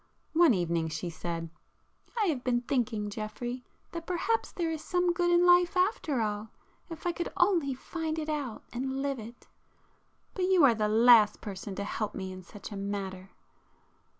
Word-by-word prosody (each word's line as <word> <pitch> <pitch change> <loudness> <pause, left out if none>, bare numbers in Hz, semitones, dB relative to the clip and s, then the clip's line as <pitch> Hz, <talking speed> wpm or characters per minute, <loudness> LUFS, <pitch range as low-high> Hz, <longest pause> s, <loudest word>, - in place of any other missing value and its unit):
One 320 -7 +6
evening 170 -2 0
she 165 +2 -4
said— 165 0 -5 0.7
"I 425 - +3
have 290 -9 -1
been 240 -1 +1
thinking, 230 -5 -1
Geoffrey, 240 +4 -5 0.3
that 335 -1 -6
perhaps 370 +6 0
there 335 -2 -2
is 315 -1 -4
some 355 -1 +1
good 350 0 +1
in 350 0 +5
life 355 +1 +5
after 360 - +1
all, 210 0 -2 0.4
if 330 0 -9
I 350 - +2
could 345 0 -4
only 340 -8 +3
find 320 +3 -4
it 310 -1 -3
out 290 -7 -3
and 265 +2 -2
live 275 -2 -1
it. 230 +2 -11 0.9
But 370 - 0
you 370 -3 +4
are 260 -4 +7
the 215 -1 0
last 220 -1 +6
person 195 -1 -6
to 200 - -3
help 210 +1 -3
me 190 0 -4
in 185 0 -8
such 200 +4 -11
a - - -5
matter." 195 -1 -4
245 Hz, 175 wpm, -30 LUFS, 205-335 Hz, 0.9 s, are